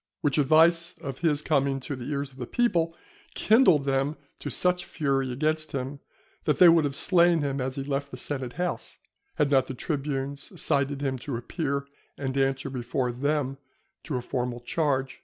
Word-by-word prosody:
Which 145 0 +1
advice 165 +4 +4
of 135 -1 -6
his 150 -3 +1
coming 140 -3 +1
to 140 +2 -4
the 125 -2 -7
ears 140 -1 -2
of 130 - -17
the - - -4
people, 170 -9 +1 0.4
kindled 210 - +5
them 135 +2 0 0.2
to - - -5
such 180 0 +1
fury 135 -3 -1
against 155 +3 -1
him, 135 +1 -4 0.5
that 150 - +2
they 180 - +8
would 165 -2 +5
have 140 -1 -2
slain 170 0 +4
him 140 -1 -1
as 130 0 -2
he 135 - -3
left 140 0 -2
the 125 - -8
Senate 130 -2 -4
House, 180 +2 -3 0.4
had 145 -2 +1
not 135 -2 +4
the 130 - -5
tribunes 140 -1 -3
cited 140 0 +1
him 130 -2 -1
to 130 -1 -4
appear 140 +2 -3 0.3
and 135 -1 -3
answer 135 0 0
before 125 0 -2
them 135 +1 -1 0.5
to 150 - -3
a 125 - -2
formal 125 -1 -3
charge. 135 -1 -1
140 Hz, 180 wpm, -27 LUFS, 135-155 Hz, 0.5 s, they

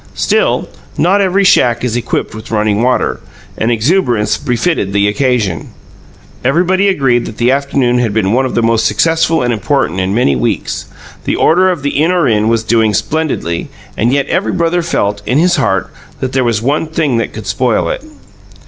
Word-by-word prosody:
Still, 485 +3 +1 0.3
not 195 +4 +2
every 195 +1 +2
shack 120 - +3
is 120 -2 -1
equipped 120 - -2
with 110 +1 -9
running 105 -1 0
water, 125 +1 0 0.4
and 115 - -1
exuberance 120 - +1
befitted 125 - -1
the 100 0 +2
occasion. 110 - -1 0.8
Everybody 180 +9 +2
agreed 135 -10 +1
that 110 - -9
the 120 +2 +2
afternoon 135 -3 +1
had 120 -3 0
been 100 -1 0
one 130 +2 +2
of - - -6
the 115 - +1
most 115 -1 +2
successful 165 -2 +1
and 120 -1 0
important 115 - -1
in 95 +2 -1
many 70 - +2
weeks. 60 - -2 0.4
The - - 0
Order 185 +3 +3
of 175 -6 -3
the 145 0 0
In 165 +3 +2
Or 175 -5 +2
In 110 -1 +1
was 115 -1 +1
doing 110 -2 +1
splendidly, 110 - -2 0.3
and 115 +3 +1
yet 140 0 0
every 110 - -1
brother 170 +1 0
felt, 105 -11 -1
in 125 - +1
his 175 +2 +3
heart, 95 -8 0 0.3
that 130 -1 -3
there 130 -1 +1
was 115 -2 0
one 145 +5 0
thing 155 -6 0
that 115 - -2
could - - -8
spoil - - 0
it. - - -4
125 Hz, 185 wpm, -13 LUFS, 110-160 Hz, 0.8 s, shack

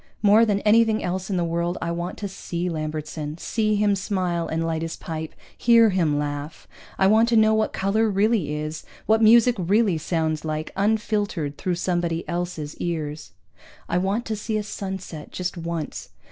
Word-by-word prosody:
More 210 +3 +6
than 200 -1 +1
anything 220 0 +4
else 185 +2 -3
in 190 - 0
the 175 - +1
world 170 +1 -1
I 170 - -2
want 170 +1 -4
to 205 - -4
see 180 -2 -4
Lambertson, 155 -1 -4
see 215 +3 0
him 205 -1 +2
smile 185 -3 -1
and 165 +1 -1
light 160 -1 -1
his 165 0 -4
pipe, 160 -1 -6 0.2
hear 230 -2 +5
him 165 -6 +1
laugh. 145 +1 -4 0.3
I 190 - +3
want 220 +4 +5
to 235 - +2
know 220 0 +5
what 220 0 +1
color 215 +3 +1
really 200 -5 +1
is, 155 +1 -4 0.2
what 220 +1 +3
music 235 +2 +6
really 190 -1 +2
sounds 160 -1 -1
like 155 0 -3
unfiltered 205 -7 0
through 180 -1 -1
somebody 175 -2 -1
else's 170 -4 -4
ears. 155 -3 -4 0.5
I 175 - +1
want 200 +6 -1
to 220 - -2
see 215 +1 -2
a 210 - -2
sunset, 190 -6 -6
just 180 0 -3
once. 165 -2 -5
180 Hz, 175 wpm, -24 LUFS, 160-210 Hz, 0.5 s, More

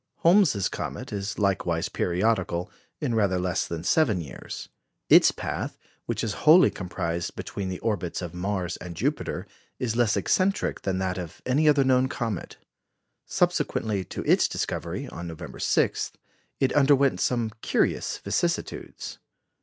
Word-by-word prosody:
Holmes's 170 - +4
comet - - -5
is 100 0 -3
likewise 95 -5 +1
periodical, 90 -1 0 0.3
in 135 -6 -1
rather 100 -5 +2
less 90 -1 0
than 85 -1 -5
seven 115 - +3
years. 80 -5 -7 0.4
Its - - +8
path, - - -4 0.3
which - - -2
is 110 - -1
wholly 165 +4 +7
comprised 85 -2 -3
between 95 -2 -4
the 90 - -3
orbits 95 -6 -1
of 90 -3 -5
Mars 90 -1 -2
and 90 -1 -8
Jupiter, - - -2 0.3
is 115 -3 -2
less 115 -3 +3
eccentric 195 +1 +1
than 95 -1 -1
that 95 -1 -1
of 85 -3 -8
any 145 +5 +3
other 145 -2 +5
known 130 0 +3
comet. 115 - -4 0.7
Subsequently 105 -4 0
to - - -5
its - - +4
discovery, - - -3
on 85 - -7
November 80 -2 -8
6, - - +1 0.5
it 135 - +2
underwent 140 -1 +4
some 120 -3 +1
curious - - 0
vicissitudes. - - -3
100 Hz, 140 wpm, -26 LUFS, 90-130 Hz, 0.7 s, Its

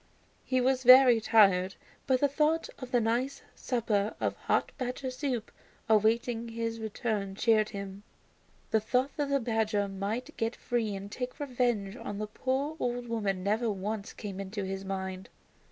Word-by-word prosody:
He 255 - +1
was 260 +1 +2
very 255 -2 +8
tired, 195 -4 +4 0.3
but 260 -2 +2
the 285 - +5
thought 305 +3 +1
of 255 - -7
the 245 - +3
nice 240 +5 -1
supper 220 -4 -1
of - - -1
hot - - 0
badger 255 +1 -3
soup 255 -4 -3 0.4
awaiting 225 +2 +2
his 230 0 -3
return 215 -2 -3
cheered 215 0 +3
him. 200 -1 -7 0.7
The 220 - +4
thought 250 +5 0
that 290 -2 -1
the 280 0 +2
badger 220 -4 0
might 200 +5 -4
get 225 +1 -1
free 225 -4 -1
and 200 +1 -7
take 250 +4 -5
revenge 240 -7 -1
on 205 -5 -6
the 215 - -2
poor 265 +7 -2
old 245 -1 -2
woman 200 -5 -1
never 220 +4 +1
once 205 +1 -3
came 200 -3 -7
into 195 +1 -4
his 190 0 -4
mind. 190 -1 -5
225 Hz, 160 wpm, -30 LUFS, 200-250 Hz, 0.7 s, very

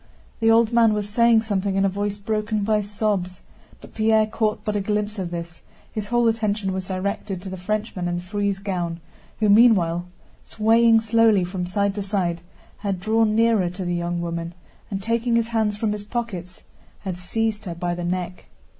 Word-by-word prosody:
The 225 -1 +3
old 225 0 +4
man 230 -2 +5
was 205 -1 -2
saying 230 +1 +4
something 200 -3 -1
in 195 0 +3
a - - +4
voice 205 +1 -2
broken 215 0 -1
by 215 0 +2
sobs, 205 -3 -2 0.4
but - - -14
Pierre 220 0 +3
caught 215 0 -1
but 210 - -1
a 205 - +1
glimpse 210 +1 -2
of 180 -2 -3
this, 170 0 -7 0.3
his 210 -2 -4
whole 240 +1 +2
attention 215 -3 0
was 190 -1 -4
directed 195 0 -3
to 195 - -6
the - - -4
Frenchman 195 -1 -3
in 175 - -1
the 175 - -4
frieze 200 +1 -1
gown 180 -4 -3 0.4
who 215 - +2
meanwhile, 195 -6 +4 0.4
swaying 225 +1 +4
slowly 225 -3 +4
from 180 0 -3
side 200 +2 0
to 205 - -4
side, 185 -4 -1 0.4
had 200 -3 -2
drawn 215 +2 +2
nearer 225 -5 +3
to 180 +1 -6
the 175 - -1
young 175 0 -2
woman 170 0 -4 0.3
and 195 -1 -4
taking 230 +2 +1
his 230 0 +1
hands 220 -3 0
from 215 0 0
his 210 -1 -4
pockets 205 -6 -5 0.4
had 190 -3 -4
seized 215 +4 -2
her 175 -3 -5
by 175 +1 -2
the 175 0 -4
neck. 180 0 -3
205 Hz, 190 wpm, -23 LUFS, 180-220 Hz, 0.4 s, man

